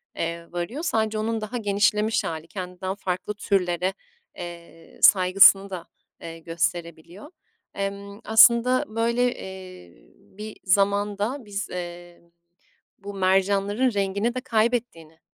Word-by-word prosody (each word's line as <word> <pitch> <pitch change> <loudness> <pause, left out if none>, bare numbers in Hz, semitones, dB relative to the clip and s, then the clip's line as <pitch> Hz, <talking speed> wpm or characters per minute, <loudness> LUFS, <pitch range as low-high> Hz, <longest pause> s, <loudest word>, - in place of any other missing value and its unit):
eee, 170 0 -4
varıyor. 175 - -4
Sadece 220 -8 0
onun 220 +1 -2
daha 215 +3 -4
genişlemiş 210 0 +1
hâli, 160 0 -5
kendinden 185 +1 -5
farklı 185 0 -4
türlere, 185 -3 0 0.4
eee, 170 -1 -11
saygısını 195 +1 +6
da, 180 -3 -7 0.3
eee, 165 0 -8
gösterebiliyor. 170 - -4 0.4
Emm, 200 +1 -5
aslında 235 +3 +5
böyle, 235 +3 0
eee, 185 - -10 0.2
bir 210 - -11
zamanda 205 +5 +1
biz, 205 0 -5
eee, 175 -1 -8 0.8
bu 200 +1 -8
mercanların 195 +5 +1
rengini 200 +4 -1
de 255 - -3
kaybettiğini, 220 -9 -1
195 Hz, 110 wpm, -24 LUFS, 175-215 Hz, 0.8 s, saygısını